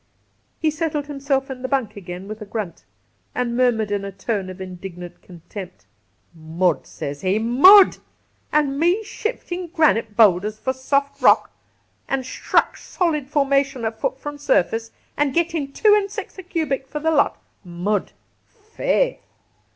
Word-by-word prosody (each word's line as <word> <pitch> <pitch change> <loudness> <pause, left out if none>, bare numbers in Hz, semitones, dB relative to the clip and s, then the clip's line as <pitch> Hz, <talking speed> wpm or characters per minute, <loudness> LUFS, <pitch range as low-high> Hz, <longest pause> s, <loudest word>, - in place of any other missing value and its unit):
He 315 -1 +1
settled 310 -2 -2
himself 275 -2 -2
in 255 -1 -7
the 260 - -3
bunk 260 -6 -1
again 180 -1 -8
with 215 +1 -7
a - - -6
grunt, 200 - -5 0.5
and 240 -1 -1
murmured 235 -4 +2
in 200 -1 -1
a 200 - -5
tone 195 0 -3
of 185 0 -9
indignant 180 -1 -8
contempt: 175 - -10 0.4
' - - -42
Mud, 160 0 -1
sez 145 0 -6
he, 190 +2 +1
mud! 285 - +7 0.5
An' 285 -2 +1
me 350 +7 +2
shiftin' 370 -5 -4
granite 300 - +1
boulders 210 -1 +4
for 260 +4 -2
soft 280 +2 -1
rock, - - +5 0.6
an 270 -1 0
shtruck 255 - 0
solid 305 -7 -2
formation 275 -3 +1
a 220 - 0
fut 225 +4 -3
from 290 +1 -7
surface, 225 -4 +1 0.3
an' 290 -2 +1
getting 330 -4 0
two 425 +7 +4
an' 410 -1 +2
six - - -7
a - - -4
cubic 315 -7 -2
fer 300 - -6
the 320 +2 +1
lot! 290 -3 +2 0.2
Mud, 180 +3 -2 0.4
faith 465 +3 -1
260 Hz, 155 wpm, -22 LUFS, 200-300 Hz, 0.6 s, mud